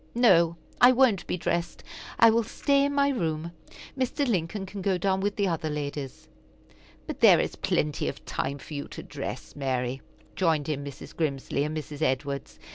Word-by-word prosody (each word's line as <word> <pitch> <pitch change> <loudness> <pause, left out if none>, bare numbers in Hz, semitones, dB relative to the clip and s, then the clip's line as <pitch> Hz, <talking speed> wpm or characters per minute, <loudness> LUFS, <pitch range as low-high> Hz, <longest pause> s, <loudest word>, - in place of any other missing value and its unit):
"No, 170 -9 +5 0.3
I 245 +1 +9
won't 245 -7 +3
be - - -1
dressed. 170 0 -2 0.3
I 230 -1 +7
will 230 +1 +3
stay 280 +5 +1
in 285 0 -1
my 280 0 +3
room. 165 - -2 0.4
Mr. 265 +2 0
Lincoln 195 -1 -1
can 195 +1 -7
go 190 -1 +1
down 190 +1 +1
with 200 +1 -1
the 200 -1 +1
other 160 -3 -1
ladies." 145 -3 -5 0.8
"But - - -6
there - - +7
is - - -1
plenty 150 -1 0
of - - -6
time 140 - -2
for 145 - -11
you 145 -1 -4
to - - -9
dress, - - -7
Mary," 130 -2 -2 0.3
joined 160 -5 +1
in 145 -2 -2
Mrs. 140 -1 -9
Grimsly 140 -3 -1
and 155 +1 -3
Mrs. 150 -1 -7
Edwards. 140 0 -1
170 Hz, 180 wpm, -27 LUFS, 145-210 Hz, 0.8 s, I